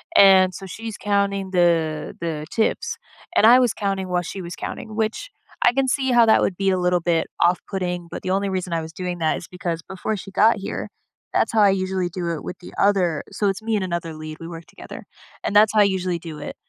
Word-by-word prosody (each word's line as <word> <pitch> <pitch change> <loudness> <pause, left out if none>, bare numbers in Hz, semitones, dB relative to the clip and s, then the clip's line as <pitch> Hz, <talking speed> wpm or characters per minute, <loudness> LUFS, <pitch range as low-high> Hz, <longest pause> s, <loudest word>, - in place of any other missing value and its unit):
And, 190 -1 +7
so 195 - -8
she's 225 +3 -7
counting 200 -2 0
the 165 -4 +1
the 155 -2 -3
tips. 220 - 0 0.4
And - - +5
I 250 +2 +8
was 245 -4 +2
counting 195 -2 -2
while 180 0 +1
she 190 +2 -6
was 170 0 -7
counting, 215 -1 -7
which, 220 - -2 0.3
I 240 - +5
can 270 0 +1
see 265 -1 +1
how 240 -1 +6
that 220 - +5
would 180 - 0
be 195 0 +1
a 185 - +1
little 180 -1 +1
bit 165 -1 +1 0.2
off 175 +1 +3
putting, 180 -3 -3
but - - -6
the 185 - -2
only 195 +1 0
reason 185 -2 -3
I 165 - 0
was 160 0 -9
doing 180 -1 -4
that 160 -1 +1
is - - -9
because 175 -2 -4
before 195 +3 -4
she 195 - -9
got 220 +3 +4
here, 195 - -5 0.4
that's - - +2
how 220 - +4
I 200 - +6
usually 185 -1 -1
do 175 -1 -4
it 160 - -5
with - - -6
the 175 - -12
other 185 -6 +2
so 205 - -1
it's 195 +3 -3
me 225 0 -1
and 200 - 0
another 170 -2 -3
lead; 155 0 -8
we 165 - -8
work 165 -1 -9
together, - - -11 0.4
and 205 - -2
that's 215 +1 +6
how 215 - +3
I - - +8
usually 185 -3 0
do 160 -3 -8
it. - - -7
185 Hz, 240 wpm, -22 LUFS, 170-205 Hz, 0.4 s, I